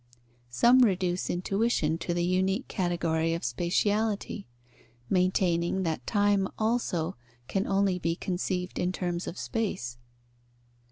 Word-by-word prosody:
Some 235 - +5
reduce 185 -6 +2
intuition 180 -3 0
to 175 +1 -2
the 175 - +1
unique 190 +6 +1
category 165 -3 0
of 170 - -5
spatiality, 200 - 0 0.7
maintaining 180 -1 +2
that 160 -7 -3
time 205 -2 +2
also 215 - 0 0.3
can 195 0 -1
only 195 -2 +2
be 165 -1 0
conceived 180 0 -3
in 180 0 +1
terms 175 -1 -3
of 175 - -5
space. 125 - -3
185 Hz, 115 wpm, -28 LUFS, 170-200 Hz, 0.7 s, Some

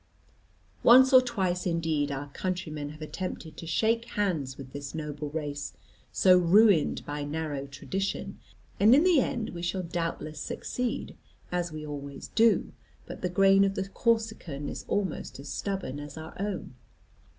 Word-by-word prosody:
Once 260 +3 +7
or 255 - +10
twice 190 -8 -1
indeed 160 -4 0
our 140 +1 -4
countrymen 155 -3 -4
have 155 +1 -9
attempted 165 -1 -5
to 165 - -8
shake 225 +7 +1
hands 160 -11 -1
with 130 -2 -10
this 145 +1 -6
noble 150 -1 -4
race, 145 -2 -4 0.4
so 185 -1 +6
ruined 180 -1 +4
by 145 0 -4
narrow 145 -2 -3
tradition; 195 +8 -4 0.4
and 215 +5 +7
in 295 - +5
the 360 -5 +5
end 245 -4 -1
we 170 - -7
shall 180 +2 -2
doubtless 165 -2 -3
succeed, 250 - -3 0.4
as 175 -1 -1
we 155 0 -6
always 140 -2 -7
do; 230 0 +3 0.3
but - - -9
the 180 - 0
grain 195 +2 +5
of 195 0 +1
the 195 - -2
Corsican 220 - -1
is - - -6
almost 190 -8 -2
as 140 - -8
stubborn 190 -9 -3
as 145 +1 -8
our 160 0 -8
own. 200 -9 -3
170 Hz, 155 wpm, -28 LUFS, 145-200 Hz, 0.4 s, or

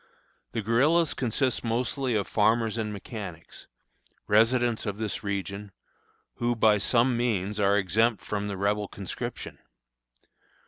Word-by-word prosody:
The 115 - -2
guerillas 145 +9 +3
consist 130 +1 -1
mostly 120 +2 -1
of 100 -2 +1
farmers 110 +1 +2
and 110 -2 -2
mechanics, 100 -5 -8 0.6
residents 115 +2 +3
of 100 -1 -3
this 110 -1 -3
region, 100 0 -4 0.6
who, 120 0 0
by 110 -2 +4
some 120 +4 +2
means, 105 -4 -1
are 100 0 +3
exempt 105 +2 +1
from 105 -1 -2
the 100 -1 -4
Rebel 100 +1 0
conscription. 100 -2 -6
110 Hz, 125 wpm, -27 LUFS, 100-120 Hz, 0.6 s, by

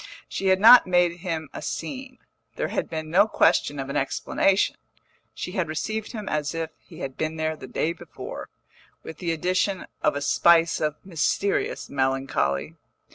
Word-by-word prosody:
She 195 - -3
had 190 0 +4
not 230 +1 +9
made 175 -1 +3
him 165 -3 -4
a - - -6
scene, 255 +10 -5 0.4
there - - -2
had - - -2
been 155 -1 -5
no 200 +5 +5
question 145 -8 +2
of 135 -1 -4
an 140 - -5
explanation; 195 +7 +1 0.5
she - - -6
had 185 -4 -1
received 215 +8 -3
him 215 -3 -6
as 150 +1 -2
if 165 -1 -3
he - - -13
had 135 -1 -5
been 155 0 -2
there 155 0 -1
the - - -10
day 165 - -1
before, 170 - -9 0.5
with 160 - -9
the 170 -2 -1
addition 185 +3 0 0.2
of - - +2
a 145 - -2
spice 165 +2 +4
of 150 -1 0
mysterious 190 +3 -1
melancholy. 135 - -1
165 Hz, 170 wpm, -25 LUFS, 150-190 Hz, 0.5 s, not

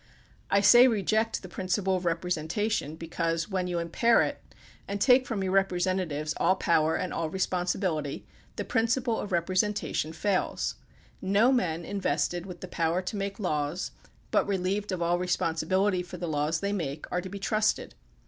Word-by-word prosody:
I 200 - +4
say, 240 +5 +8
reject 220 -1 0
the - - -7
principle 185 +1 -1
of 180 -1 -3
representation, 170 +1 -1
because 165 +1 -2
when 185 -2 -1
you 175 -1 -2
impair 170 +8 +3
it - - -4 0.5
and 200 0 -3
take 250 +3 +5
from 210 -5 -2
your 190 - -1
representatives 180 -5 0
all 185 - +3
power 160 -3 +2
and 185 - -2
all 160 - -2
responsibility, 180 -4 -1 0.3
the - - -4
principle 230 0 +1
of 205 - -4
repre 175 0 -1
sentation 210 -6 -2
falls. 195 +2 0 0.5
No 200 +6 +4
men 170 -10 0
invested 175 -2 -1
with 180 -2 -9
the 185 - -6
power 170 +1 0
to 185 - -4
make 200 0 -3
laws, 155 -2 -2 0.4
but - - +2
relieved 200 +1 -1
of 180 -2 -1
all 175 +1 +1
responsibility 180 +2 +1
for 180 0 -8
the 175 0 -4
laws 155 +1 0
they 200 0 -1
make, 150 -6 -3
are 180 - 0
to 185 - -7
be 200 - -6
trusted. 215 +2 0
185 Hz, 165 wpm, -28 LUFS, 170-200 Hz, 0.5 s, say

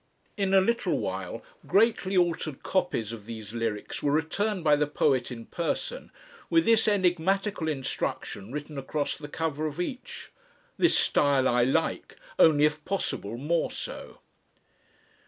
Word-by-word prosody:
In 195 -2 0
a 190 - +7
little 235 +5 +1
while, - - -4 0.2
greatly 200 -2 +3
altered 165 -5 0
copies 180 - 0
of 110 -2 -9
these 110 -2 -8
lyrics 115 -3 -3
were 145 - +1
returned 180 +6 0
by 150 -2 +5
the 150 0 +1
poet 130 -3 +1
in 115 -2 -7
person, 485 - -3 0.4
with 330 0 +4
this 225 -1 +4
enigmatical 190 -1 +1
instruction 130 -7 -3
written 145 0 -5
across 145 +2 -2
the 145 - -8
cover 155 0 -2
of 150 +2 -7
each: 250 +7 -5 0.4
"This - - +4
style 140 -2 +3
I 120 0 +3
like, 130 - -1 0.2
only 150 -2 +6
if 150 0 0
possible 135 - -3
more 160 +6 0
so." - - -7
155 Hz, 140 wpm, -28 LUFS, 135-190 Hz, 0.4 s, a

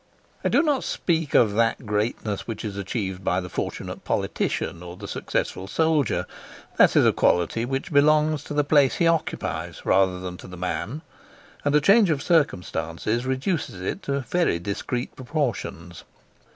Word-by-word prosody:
I - - +2
do - - +4
not 290 -5 +1
speak 165 -4 -1
of 110 -4 +5
that 115 +2 +1
greatness 105 0 -2
which 115 0 -5
is 100 -2 -4
achieved 95 -2 -3
by 90 0 +1
the 90 -1 -6
fortunate - - -5
politician 85 - -2
or 90 0 -9
the - - -8
successful 95 - -3
soldier; 155 +2 +1 0.5
that - - +6
is - - +6
a - - +5
quality 90 +7 +2
which 135 +4 -3
belongs 150 0 +4
to 150 - -5
the 145 - +3
place 145 -2 +4
he 170 - +1
occupies 165 -1 -1
rather 95 -1 +3
than 90 -1 -6
to - - -11
the 90 0 -10
man; 105 - -3 0.6
and 145 0 +2
a 150 - +5
change 200 +4 +5
of 145 -3 0
circumstances 105 - 0
reduces 130 - -2
it 95 - -3
to 140 0 -2
very 170 - +1
discreet 100 +7 -4
proportions. 120 - -3
120 Hz, 165 wpm, -24 LUFS, 95-150 Hz, 0.6 s, that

